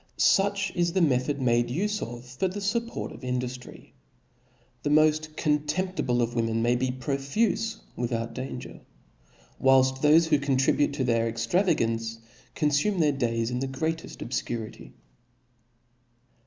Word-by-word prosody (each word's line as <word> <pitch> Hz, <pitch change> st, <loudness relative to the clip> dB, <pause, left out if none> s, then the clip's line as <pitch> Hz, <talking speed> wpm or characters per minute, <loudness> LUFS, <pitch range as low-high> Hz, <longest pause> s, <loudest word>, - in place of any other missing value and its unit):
Such 200 Hz, 0 st, +3 dB
is 170 Hz, -1 st, +1 dB
the 190 Hz, -, +2 dB
method 140 Hz, 0 st, +1 dB
made 120 Hz, -2 st, +2 dB
ufe 205 Hz, +11 st, -1 dB
of 120 Hz, +1 st, -6 dB
for 125 Hz, +9 st, -2 dB
the 190 Hz, +3 st, -5 dB
fupport 230 Hz, +4 st, -2 dB
of -, -, -12 dB
induftry 125 Hz, 0 st, -4 dB
j -, -, -25 dB, 0.9 s
the 145 Hz, -, -1 dB
moft 155 Hz, 0 st, +3 dB
contemptible 150 Hz, -4 st, 0 dB
of 120 Hz, 0 st, -2 dB
women 115 Hz, -1 st, 0 dB
may 120 Hz, +1 st, +3 dB
be 130 Hz, +1 st, 0 dB
profufe 140 Hz, -, -1 dB, 0.2 s
without 115 Hz, -1 st, -2 dB
danger, 130 Hz, 0 st, -7 dB, 0.8 s
whilft 130 Hz, 0 st, +4 dB
thofe 155 Hz, +3 st, +6 dB
who 150 Hz, -2 st, +4 dB
contribute 140 Hz, +1 st, +2 dB
to 140 Hz, -2 st, -1 dB
their 115 Hz, -2 st, +1 dB
extravagance, 115 Hz, -, 0 dB, 0.4 s
confume 150 Hz, +6 st, +1 dB
their 150 Hz, -3 st, +4 dB
days 115 Hz, -3 st, -1 dB
in 125 Hz, -, -1 dB
the 135 Hz, -, -2 dB
greateft 160 Hz, +5 st, -4 dB
obfcurity. 115 Hz, -2 st, -5 dB
135 Hz, 135 wpm, -27 LUFS, 120-160 Hz, 0.9 s, thofe